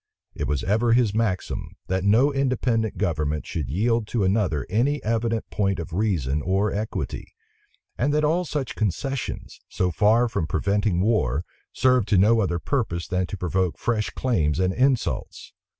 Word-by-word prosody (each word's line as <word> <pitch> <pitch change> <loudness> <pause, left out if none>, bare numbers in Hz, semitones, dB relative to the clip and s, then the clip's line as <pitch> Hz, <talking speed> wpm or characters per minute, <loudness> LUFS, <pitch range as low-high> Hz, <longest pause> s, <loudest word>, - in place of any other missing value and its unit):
It - - -3
was 75 -2 -1
ever 115 +4 +2
his 120 -4 +3
maxim, 110 -4 -2
that 95 0 -1
no 120 +8 +4
independent 125 -6 0
government 75 -5 -1
should 75 -7 -4
yield 110 - +1
to 110 -2 0
another 95 - +1
any 125 +10 +1
evident 115 0 -1
point 100 -2 0
of 85 -1 -6
reason 85 - 0
or 95 +5 +1
equity; 105 +2 -4 0.6
and 140 +4 +2
that 150 +1 +1
all 165 +4 +2
such 145 -6 -3
concessions, 125 +6 -3
so 90 -1 0
far 110 +7 +3
from 85 -8 -2
preventing 100 +1 0
war, 85 - +1 0.3
served 125 -4 +2
to 100 - +3
no 110 +5 +5
other 90 -5 0
purpose 85 - -2
than 90 0 -1
to 100 - -6
provoke 90 0 -1
fresh 110 -3 -1
claims 85 - 0
and 95 0 +1
insults. 130 +1 -1
105 Hz, 160 wpm, -24 LUFS, 90-120 Hz, 0.6 s, no